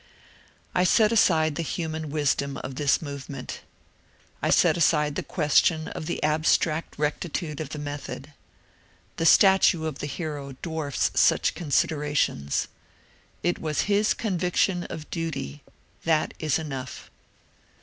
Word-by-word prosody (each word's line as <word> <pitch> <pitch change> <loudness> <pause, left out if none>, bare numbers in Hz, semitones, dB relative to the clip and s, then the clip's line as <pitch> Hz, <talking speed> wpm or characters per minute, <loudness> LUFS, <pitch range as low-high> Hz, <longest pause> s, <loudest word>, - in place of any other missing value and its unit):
I 180 - +3
set 215 +3 +4
aside 160 -8 +3
the 170 - -3
human 160 -1 -4
wisdom 140 -2 0
of 135 - -5
this 145 +3 +1
movement. 140 -2 -7 0.8
I - - 0
set - - +4
aside 150 -3 +2
the - - -2
question 155 0 +2
of 155 - -6
the 170 - -3
abstract 155 +1 +1
rectitude 150 +1 -2
of 150 - -5
the 150 - -6
method. 145 0 -6 0.8
The 165 - +2
stature 190 -3 +5
of 155 -3 -4
the 145 - -3
hero 145 -2 -5
dwarfs 160 -4 -1
such - - +3
considerations. 145 - 0 0.8
It 175 - 0
was 155 -2 -1
his 210 +1 +2
conviction 180 -2 0
of 155 -1 -7
duty 150 -3 -4 0.2
— - - -34
that 160 -2 +1
is 155 -3 +1
enough. 135 -5 -7
155 Hz, 130 wpm, -26 LUFS, 145-165 Hz, 0.8 s, stature